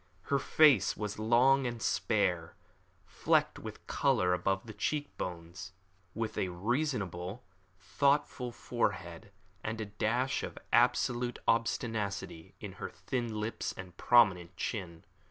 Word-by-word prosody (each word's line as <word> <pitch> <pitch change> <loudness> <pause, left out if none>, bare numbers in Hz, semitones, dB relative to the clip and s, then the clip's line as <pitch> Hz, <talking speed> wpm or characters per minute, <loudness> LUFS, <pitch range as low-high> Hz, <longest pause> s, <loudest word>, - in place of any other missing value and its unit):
Her 140 - +4
face 145 -6 +4
was 105 0 -4
long 125 +4 +4
and 120 -1 -4
spare, 90 -7 0 0.5
flecked - - +1
with - - -9
colour 90 0 +2
above 95 +3 0
the 110 - -8
cheek 145 +6 -2
bones, 90 +2 -6 0.4
with 110 0 -3
a - - 0
reasonable, 100 - -2 0.4
thoughtful 125 +6 +1
forehead, 100 -7 -3 0.3
and 110 +1 -3
a 110 - -2
dash 115 +6 0
of - - -6 0.2
absolute 120 0 +2
obstinacy 110 -7 -1
in - - -7
her - - -3
thin 120 -4 -3
lips 110 +2 -3
and 95 -2 -9
prominent 95 -6 +4
chin. 85 -7 -4
110 Hz, 120 wpm, -32 LUFS, 95-120 Hz, 0.5 s, Her